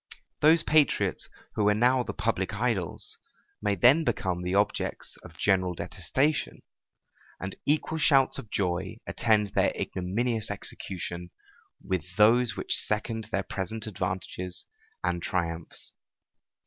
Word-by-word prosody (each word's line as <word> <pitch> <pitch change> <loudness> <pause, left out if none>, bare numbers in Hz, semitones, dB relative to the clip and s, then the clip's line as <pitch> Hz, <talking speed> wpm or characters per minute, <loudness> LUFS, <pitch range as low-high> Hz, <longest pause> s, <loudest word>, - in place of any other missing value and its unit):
Those 160 +2 +5
patriots 155 -2 +2 0.2
who 105 -1 +2
are 105 - +3
now 125 +4 +4
the - - -3
public 100 -1 -1
idols, 110 -6 -2 0.4
may 105 -1 +1
then 130 - +6
become 95 - -1
the 90 +1 -1
objects 100 +1 0
of - - -14
general 95 -3 +2
detestation; 145 - -1 0.8
and 95 +1 -5
equal 155 +2 +1
shouts 135 -3 +4
of 110 - -9
joy 90 -3 -1
attend 110 -3 +2
their - - +2
ignominious 110 +5 -1
execution, 90 -3 -5 0.5
with 90 -1 -3
those 110 +2 +4
which - - 0
second 110 +1 -2
their 100 - 0
present 100 +4 -4
advantages 90 -2 -4 0.4
and 85 -1 0
triumphs. 85 -2 -3
105 Hz, 120 wpm, -28 LUFS, 90-120 Hz, 0.8 s, then